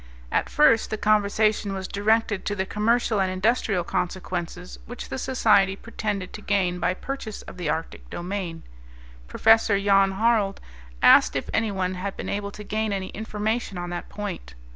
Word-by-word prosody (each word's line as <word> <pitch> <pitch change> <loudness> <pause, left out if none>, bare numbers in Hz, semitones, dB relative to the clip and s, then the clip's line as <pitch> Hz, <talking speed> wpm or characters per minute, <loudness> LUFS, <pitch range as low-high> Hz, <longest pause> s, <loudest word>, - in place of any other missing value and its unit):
At - - 0
first 290 -7 +4
the 215 - -2
conversation 210 -1 +2
was 190 -1 -4
directed 210 0 +1
to 205 - -1
the 190 -1 -1
commercial 220 +1 +1
and 190 - +1
industrial 195 -1 +1
consequences 180 0 -4
which 245 +1 -8
the 265 - -4
Society 210 -7 +3
pretended 205 -3 -4
to 210 - -8
gain 185 -4 0
by 180 +1 0
purchase 240 -2 -6
of - - -11
the 175 -4 -3
Arctic 160 +2 -4
domain. 175 -2 -5 0.6
Prof. 225 - +4
Jan 195 -1 +3
Harald 215 -1 +1 0.4
asked - - +7
if - - -3
any 225 -1 +1
one 185 -1 -1
had 190 +2 -5
been - - -5
able 200 0 -2
to 210 +1 -10
gain 215 +1 -2
any 190 -1 -3
information 215 -1 -3
on 175 0 -5
that 175 - -5
point. 60 - -6
200 Hz, 165 wpm, -25 LUFS, 185-220 Hz, 0.6 s, asked